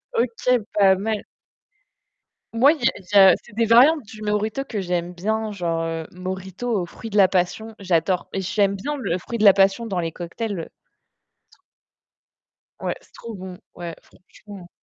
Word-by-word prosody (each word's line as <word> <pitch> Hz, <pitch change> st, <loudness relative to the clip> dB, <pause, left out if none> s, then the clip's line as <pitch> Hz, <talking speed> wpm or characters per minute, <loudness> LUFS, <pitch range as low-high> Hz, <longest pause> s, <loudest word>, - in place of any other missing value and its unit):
OK, 240 Hz, +1 st, +1 dB
pas 195 Hz, -2 st, +5 dB
mal. 215 Hz, +2 st, -2 dB, 1.3 s
Moi, 260 Hz, +6 st, +6 dB
il -, -, -7 dB
y -, -, -16 dB
a -, -, -3 dB
il 190 Hz, -, -15 dB
y -, -, +9 dB
a 190 Hz, -2 st, +8 dB
c'est 235 Hz, -, -17 dB
des 230 Hz, 0 st, +2 dB
variantes 275 Hz, +7 st, +6 dB
du 215 Hz, +1 st, -11 dB
mojito 210 Hz, +5 st, -1 dB
que 215 Hz, -7 st, -4 dB
j'aime 175 Hz, -1 st, -2 dB
bien, 215 Hz, +4 st, -2 dB
genre, 170 Hz, -4 st, -2 dB
heu, 165 Hz, -1 st, -4 dB
mojito 190 Hz, +4 st, -4 dB
au -, -, -3 dB
fruit 225 Hz, +5 st, -9 dB
de 210 Hz, -, -1 dB
la 195 Hz, -2 st, +7 dB
passion, 195 Hz, +5 st, -1 dB
j'adore. 180 Hz, -1 st, 0 dB
J'aime 195 Hz, +1 st, 0 dB
bien 290 Hz, +10 st, -4 dB
le 195 Hz, -9 st, -2 dB
fruit 235 Hz, +6 st, -5 dB
de 215 Hz, -, -1 dB
la 200 Hz, -2 st, +9 dB
passion 195 Hz, +4 st, +2 dB
dans 190 Hz, -5 st, -2 dB
les 165 Hz, -1 st, -2 dB
cocktails. 180 Hz, +2 st, -5 dB, 2.1 s
Ouais, -, -, -2 dB
c'est -, -, -25 dB
trop 230 Hz, -, -9 dB
bon, 185 Hz, -1 st, -9 dB, 0.2 s
ouais, 170 Hz, -2 st, -6 dB
franchement. 190 Hz, 0 st, -15 dB
200 Hz, 175 wpm, -22 LUFS, 180-225 Hz, 2.1 s, y